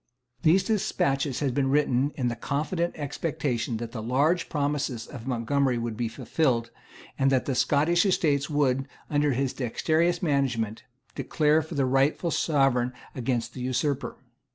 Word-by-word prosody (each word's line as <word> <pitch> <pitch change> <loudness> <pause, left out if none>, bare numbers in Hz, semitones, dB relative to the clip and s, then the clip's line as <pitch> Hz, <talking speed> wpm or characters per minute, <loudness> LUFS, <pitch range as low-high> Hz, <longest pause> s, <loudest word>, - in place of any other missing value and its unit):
These 175 +3 +4
despatches 140 - 0
had 135 -4 0
been 135 0 +1
written 140 -1 +2
in 125 -3 -1
the 120 - -1
confident 155 +7 -2
expectation 140 -5 -2
that 115 0 -6
the 115 - -5
large 145 +10 +1
promises 145 -5 -1
of 125 -3 -10
Montgomery 130 +1 +1
would 115 -1 -3
be 120 +1 -1
fulfilled, 115 0 0 0.5
and 135 0 +3
that 130 -2 +2
the 135 - -1
Scottish 155 +7 +3
Estates 150 -7 +1
would, 135 -3 +1 0.2
under 145 -1 +2
his 135 +1 -1
dexterous 160 +8 0
management, 125 -8 0 0.3
declare 155 0 +2
for 160 +1 -8
the 140 -2 +2
rightful 135 +6 +2
Sovereign 135 -6 +2 0.2
against 120 -1 -2
the 130 - -7
Usurper. 130 +3 -1
140 Hz, 150 wpm, -27 LUFS, 125-150 Hz, 0.5 s, These